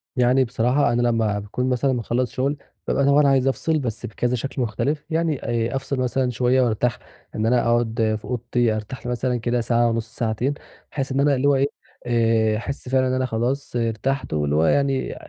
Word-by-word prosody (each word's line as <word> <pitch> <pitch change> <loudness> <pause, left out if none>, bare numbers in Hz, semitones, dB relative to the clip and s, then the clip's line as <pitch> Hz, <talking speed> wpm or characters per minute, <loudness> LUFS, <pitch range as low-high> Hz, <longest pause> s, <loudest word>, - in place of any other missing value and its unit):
يعني 125 +1 +4
بصراحة، 125 +2 +1
أنا 120 - +1
لمَّا 115 -4 +1
باكون 115 +5 -3
مثلًا 130 +1 +1
مخلَّص 120 +1 -1
شغل، 140 +3 -1 0.3
بابقى 140 - +1
طبعًا 140 +1 +5
عايِز 135 -1 +3
أفصل، 155 +5 +1
بس 115 -5 -3
بكذا 120 +3 -1
شكل 135 +2 -4
مختلِف. 140 +6 -1
يعني، 160 -1 0 0.4
أفصِل 135 0 -2
مثلًا 130 0 0
شوية 125 +2 +2
وأرتاح، 120 0 0 0.4
إن 110 - -1
أنا 120 +1 +3
أقعد 115 -2 +1
في 105 - -13
أوضتي، 120 -1 0
أرتاح 110 +5 -7
لي 125 - -2
مثلًا 125 0 -1
كده 120 +1 -1
ساعة 120 0 +2
ونُصّ، 115 0 -3
ساعتين، 115 +4 -1 0.4
بحيث 135 -2 -3
إن 135 - 0
أنا 140 0 +3
اللي 130 +2 +1
هو 140 - +4
إيه، 135 +1 +2 0.4
آآ، 115 -2 +2
أحس 130 +2 -5
فعلًا 130 0 +2
إن 130 - 0
أنا 130 0 0
خلاص 125 +4 -2
ارتحت، 120 - -1
واللي 75 -1 0
هو 80 +2 +3
يعني 135 - +1
125 Hz, 190 wpm, -22 LUFS, 115-135 Hz, 0.4 s, طبعًا